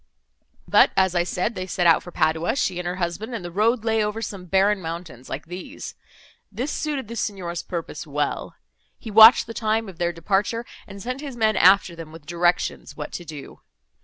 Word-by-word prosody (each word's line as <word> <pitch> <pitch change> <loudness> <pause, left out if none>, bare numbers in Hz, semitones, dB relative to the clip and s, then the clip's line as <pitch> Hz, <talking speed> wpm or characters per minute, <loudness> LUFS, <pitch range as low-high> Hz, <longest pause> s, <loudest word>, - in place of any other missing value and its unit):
But, - - +6
as 190 -2 +3
I 175 - +2
said, 180 +5 -2
they 185 -2 -5
set 180 0 -1
out 165 -1 +6
for - - -10
Padua, 160 +3 +1
she 185 -10 -1
and 180 - -4
her 180 - -2
husband, 190 +6 -3
and 190 -6 -6
the 175 - -6
road 220 +5 +1
lay 220 -1 +2
over 210 +1 -2
some 200 -4 -6
barren 195 +2 +2
mountains 165 -7 -7
like 140 - -5
these. 180 +2 -8 0.6
This 245 +8 -3
suited 290 -6 -3
the 235 - -7
Signor's 180 -6 -3
purpose 170 -1 -6
well. 145 0 -2 0.4
He 225 - -9
watched 220 +3 +9
the 230 - -8
time 220 0 0
of 185 -4 -11
their 175 0 +1
departure, 195 +7 -1 0.2
and 200 -1 -10
sent 255 +3 -4
his 275 -5 -7
men 220 -2 +2
after 190 -2 +5
them, 165 -2 -9
with 160 -2 -13
directions 175 -3 -1
what 150 - -6
to 175 - -6
do. 150 -3 -10
185 Hz, 200 wpm, -23 LUFS, 170-220 Hz, 0.6 s, watched